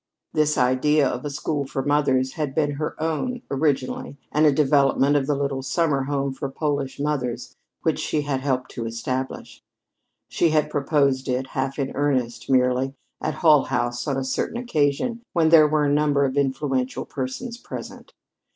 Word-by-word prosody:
This 150 0 +2
idea 135 +3 +3
of 125 - -3
a - - -2
school 145 0 -2
for 135 - -3
mothers 135 -3 +2
had 145 -4 -3
been 150 -2 +2
her 150 +2 -4
own, 165 +11 -2
originally, 140 -1 -1
and 155 +1 +4
a - - +6
development 140 0 +3
of 140 -2 +1
the 145 - +1
little 140 -1 -2
summer 135 0 0
home 140 -1 -1
for 135 +1 -4
Polish 140 -1 -2
mothers 125 -5 -2 0.3
which 160 - +1
she 155 - -1
had 140 -2 -1
helped 130 -2 -1
to 115 -2 -4
establish. 130 +3 -4 0.7
She 170 - +2
had 150 -1 +1
proposed 140 -2 +1
it, 130 +1 -1
half 135 +1 -2
in 135 -2 -2
earnest, 130 -5 -1
merely, 130 +1 +2 0.3
at - - -2
Hull 155 -5 +5
House 120 0 -2
on 140 -2 0
a 135 - -1
certain 130 - -2
occasion 230 - 0
when 165 -3 +3
there 160 -2 +7
were 150 0 +2
a 145 - +2
number 145 -1 +3
of 130 0 -2
influential 135 -2 -1
persons 145 - -5
present. - - -9
140 Hz, 170 wpm, -23 LUFS, 130-150 Hz, 0.7 s, there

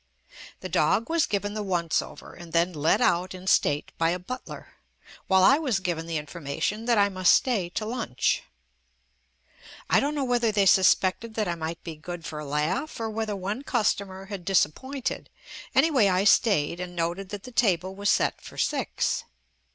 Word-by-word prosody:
The - - -5
dog 230 +8 +1
was 335 -2 +2
given 205 0 -2
the 215 - -3
once 175 -5 0
over, - - -11
and 170 -1 -12
then 170 +2 +2
led 155 +1 +2
out 180 +2 +1
in 185 0 -10
state 145 -6 +2
by 165 0 +3
a 175 - 0
butler, 185 +8 -8 0.6
while 190 -1 +4
I 275 +9 +6
was 270 -8 0
JUST 195 - 0
ME - - -22
given 165 -2 -2
the 165 -1 -2
information 155 +8 -4
that 235 -2 +2
I 200 0 +5
must 185 -2 +3
stay 210 -9 0
to 215 +5 -4
lunch. 225 - -1 1.5
I - - +6
don't 290 +2 -1
know 285 - -1
whether 240 -3 +1
they 205 -2 +2
suspected 190 +4 +3
that 215 -3 -1
I 175 - 0
might 165 0 -5
be 165 -2 -6
good 165 +1 -8
for 150 - -6
a 150 - -6
laugh 165 - -2
or 225 -1 -3
whether 215 -1 -2
one 200 +6 -4
cus 240 -6 +2
tomer 195 0 -9
had 200 -4 -6
disappointed, 235 - -1 0.5
anyway 275 -10 +4
I 185 0 +2
stayed 200 - +3
and 180 -1 -6
noted 175 +3 -2
that 205 -1 -7
the 255 - -10
table 190 -6 +1
was 200 +1 -1
set - - +1
for - - -12
six. - - -1
190 Hz, 190 wpm, -26 LUFS, 170-220 Hz, 1.5 s, I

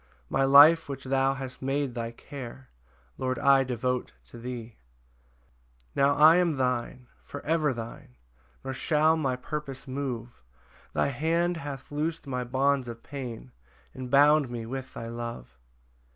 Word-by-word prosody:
My 135 - +2
life 145 +4 +7
which 135 -1 -5
thou 135 0 +1
hast 130 -2 -7
made 135 0 -1
thy 115 -1 -3
care, 130 +1 -10 0.5
Lord, 130 -1 -1
I 135 +1 +5
devote 125 0 -2 0.2
to 120 - -10
thee. 120 -2 -7 1.2
5 - - -36
Now 140 +1 +3
I 155 +4 +7
am 170 -5 +2
thine, 125 -1 -1 0.2
for 145 - -9
ever 155 -2 +2
thine, 115 - -8 0.5
Nor 135 - -4
shall 155 +4 +3
my 135 -5 0
purpose 140 +1 -6
move; 125 - -5 0.5
Thy - - +1
hand 165 +5 0
hath 140 -4 -7
loos'd 155 +2 -2
my 125 -2 -3
bonds 135 +1 +1
of 115 0 -8
pain, 120 - -7 0.4
And 130 -1 -7
bound 145 0 +5
me 120 -2 -5
with 130 +2 -6
thy 115 - -6
love. 115 - -7
135 Hz, 150 wpm, -28 LUFS, 125-145 Hz, 1.2 s, life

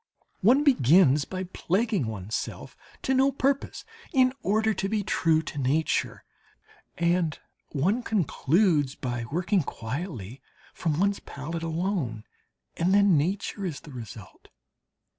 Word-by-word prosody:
One 255 +9 +4
begins 155 - +5
by 185 0 -4
plaguing 190 - -1
one's 105 -1 -6
self - - -4 0.3
to 265 - +1
no 265 +1 +4
purpose 275 +1 -1 0.3
in 255 -1 +4
order 220 +2 +2
to 195 -1 -2
be 215 -1 0
true 160 -4 +2
to 145 - -6
nature, 145 +4 0 0.7
and 170 -2 +1 0.3
one 185 - 0
concludes 165 - +1
by 120 -2 -4
working 180 +4 +1
quietly 125 - -6 0.3
from 160 -3 -1
one's 200 +1 +1
palette 165 +4 -6
alone, 165 - -2 0.5
and 180 +4 +2
then 200 -3 +5
nature 190 +6 -1
is 170 -6 -4
the 150 - -12
result. 110 -5 -10
170 Hz, 125 wpm, -27 LUFS, 140-200 Hz, 0.7 s, begins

